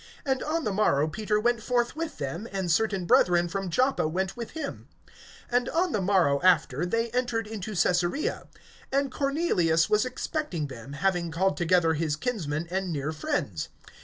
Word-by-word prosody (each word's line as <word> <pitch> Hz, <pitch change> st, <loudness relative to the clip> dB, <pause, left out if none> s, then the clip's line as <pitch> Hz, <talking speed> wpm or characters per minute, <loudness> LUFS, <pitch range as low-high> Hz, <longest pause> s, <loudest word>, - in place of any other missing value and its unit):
And 265 Hz, -1 st, 0 dB
on 320 Hz, +1 st, -1 dB
the 210 Hz, -, -1 dB
morrow 155 Hz, -8 st, +2 dB
Peter 210 Hz, +6 st, -1 dB
went 240 Hz, +1 st, +1 dB
forth 240 Hz, +2 st, 0 dB
with 325 Hz, 0 st, -4 dB
them, 150 Hz, +10 st, -4 dB
and 190 Hz, -3 st, -1 dB
certain 195 Hz, 0 st, +1 dB
brethren 175 Hz, 0 st, +4 dB
from 195 Hz, +1 st, -3 dB
Joppa 255 Hz, -, +2 dB
went 185 Hz, +4 st, -2 dB
with 235 Hz, -2 st, -7 dB
him. 295 Hz, -3 st, -5 dB, 0.6 s
(24)And 245 Hz, +4 st, +1 dB
on 355 Hz, +1 st, +2 dB
the 210 Hz, -, 0 dB
morrow 180 Hz, -8 st, +3 dB
after, 175 Hz, -3 st, +3 dB
they 230 Hz, +4 st, 0 dB
entered 240 Hz, -2 st, 0 dB
into 215 Hz, -1 st, -6 dB
Caesarea. 175 Hz, -, 0 dB, 0.4 s
And 275 Hz, 0 st, +1 dB
Cornelius 265 Hz, -, +1 dB
was 210 Hz, 0 st, +4 dB
expecting 255 Hz, -, -3 dB
them, 135 Hz, 0 st, -9 dB
having 175 Hz, +2 st, 0 dB
called 190 Hz, +4 st, +1 dB
together 175 Hz, -2 st, +3 dB
his 155 Hz, -1 st, -1 dB
kinsmen 165 Hz, -, -2 dB
and 190 Hz, -1 st, -1 dB
near 150 Hz, 0 st, -2 dB
friends. 105 Hz, -, -2 dB
190 Hz, 165 wpm, -27 LUFS, 165-240 Hz, 0.6 s, brethren